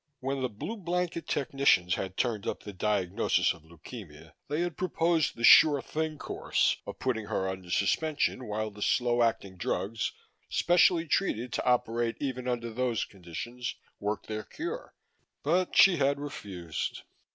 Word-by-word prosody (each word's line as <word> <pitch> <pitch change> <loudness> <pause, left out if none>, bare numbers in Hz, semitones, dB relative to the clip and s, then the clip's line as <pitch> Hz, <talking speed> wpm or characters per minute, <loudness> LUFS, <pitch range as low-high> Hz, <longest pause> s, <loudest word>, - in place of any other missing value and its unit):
When 135 +1 -2
the 130 - 0
Blue 120 - -6
Blanket 175 -2 -2
technicians 135 -10 +2
had 95 +1 -3
turned 115 -5 -1
up - - -3
the 105 - -7
diagnosis 100 +1 +1
of 85 - -17
leukemia, 80 -2 -11
they 150 +3 -1
had 175 -3 -2
proposed 165 -3 +1
the 115 - -7
sure 145 +3 +8
thing 155 +2 -3
course - - 0
of - - -6
putting 115 -5 -1
her 95 - -1
under 95 -1 -5
suspension 135 - +1
while 110 +1 -2
the 105 +1 -12
slow 120 +2 +2
acting 100 -5 0
drugs 100 +6 -2 0.4
specially 175 -1 +4
treated 125 - 0
to - - -2
operate 120 -1 +1
even 130 -3 -3
under 120 -2 -2
those 125 -1 0
conditions 100 +7 -6 0.2
worked 105 +1 -2
their 110 0 -4
cure, 390 +10 -6 0.5
but 175 +5 +1
she 190 -3 +8
had 140 0 +2
refused. 95 - -5
120 Hz, 150 wpm, -29 LUFS, 100-145 Hz, 0.5 s, sure